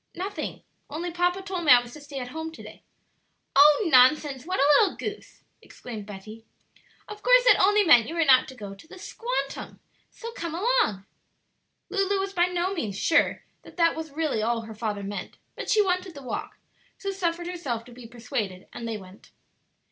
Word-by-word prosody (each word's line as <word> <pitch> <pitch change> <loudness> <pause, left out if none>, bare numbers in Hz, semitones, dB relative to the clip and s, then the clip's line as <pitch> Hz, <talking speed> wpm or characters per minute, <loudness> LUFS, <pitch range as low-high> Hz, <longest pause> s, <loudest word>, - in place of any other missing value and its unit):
"Nothing; 385 +3 -5 0.3
only 340 +4 -4
papa 355 +2 0
told 375 -2 -4
me 295 - +5
I 250 - +9
was 245 0 -10
to 300 - -11
stay 285 -1 -9
at 250 -2 -5
home 320 +3 -6
to - - -11
day." - - -12 0.7
"Oh, 295 +7 +6
nonsense! 265 +2 +4
what 370 - -1
a - - +4 0.2
little 410 - +2
goose!" 425 0 -7 0.2
exclaimed 220 -4 -9
Betty; 215 +2 -10 0.6
"of 420 0 -9
course - - +5
that - - +5
only 415 +2 +5
meant 240 - +6
you 330 - -5
were 330 -1 +2
not 260 -2 +6
to 260 - -10
go 205 -4 -8
to 195 +11 -16
the 375 - -12
'squantum'; 475 +6 -5 0.3
so 465 0 -9
come 340 -9 -5
along." 355 - +1 0.9
Lulu 395 0 +1
was 390 0 -3
by 350 -1 +3
no 360 +1 -1
means 215 - -4
sure 325 - +2 0.2
that - - -16
that 335 -1 +3
was 320 0 -6
really 290 -6 -1
all 230 +1 0
her 225 0 -9
father 210 -2 -4
meant, 195 -2 -6 0.2
but - - -6
she 425 - +4
wanted 365 -2 -2
the 280 - -10
walk, 250 - -5 0.4
so 395 - -4
suffered 345 -3 -2
herself 280 -11 -4
to 245 - -14
be 240 -1 -12
persuaded, 220 -5 -5
and 235 - -6
they 225 -1 -3
went. 190 0 -15
315 Hz, 195 wpm, -26 LUFS, 235-370 Hz, 0.9 s, I